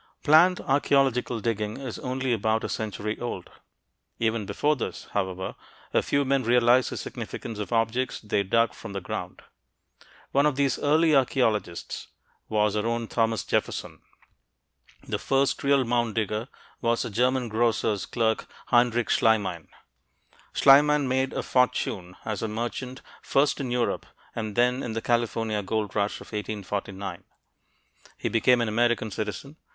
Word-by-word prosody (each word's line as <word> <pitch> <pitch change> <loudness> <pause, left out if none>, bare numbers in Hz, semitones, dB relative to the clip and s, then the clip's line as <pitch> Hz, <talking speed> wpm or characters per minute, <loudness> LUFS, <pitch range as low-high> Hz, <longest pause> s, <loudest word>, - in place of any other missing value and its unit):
Planned 165 +4 +5
archeological 135 -4 +2
digging 110 -2 -2
is 130 -4 -6
only 130 0 -1
about 110 0 0
a - - -3
century 105 0 -3
old. 120 -7 -5 0.7
Even 110 -2 0
before 150 +9 +1
this, 130 - -5
however, 95 -2 -2 0.4
a - - +4
few 140 0 +1
men 135 0 +2
realized 120 +1 +4
the - - -5
significance 110 -3 -6
of 105 - -4
objects 120 +3 0
they 105 -1 0
dug 115 +4 +2
from 100 - -9
the 100 - -2
ground; - - -6 0.9
one 140 +2 +4
of 150 - 0
these 140 -2 +1
early 155 +2 +3
archeologists 115 -9 0 0.4
was 105 -1 +2
our 105 +1 0
own 115 0 -1
Thomas 115 -1 0
Jefferson. - - -2 1.1
The - - -2
first 135 0 +1
real 140 -1 +4
mound 120 -2 0
digger 110 +1 -1 0.3
was 115 -1 +1
a - - -5
German 125 +3 +1
grocer's 110 -3 0
clerk, 110 -2 0 0.2
Heinrich 120 -1 +3
Schliemann. 100 -7 +2 0.8
Schliemann 145 +1 +5
made 130 +1 +1
a - - -3
fortune 125 -8 0
as 110 -2 -3
a 115 - -1
merchant, 120 +4 -4 0.2
first 140 +2 +2
in 135 -3 -3
Europe 120 -1 -1 0.3
and 110 -3 -4
then 125 +2 +2
in 115 - -4
the 115 - -2
California 115 -2 0
gold 105 +1 -2
rush 105 -1 0
of - - -10
1849. 100 -3 -4 0.9
He - - -2
became 120 +2 +3
an 115 - 0
American 115 0 +1
citizen. 110 +9 -5
115 Hz, 145 wpm, -26 LUFS, 105-130 Hz, 1.1 s, Planned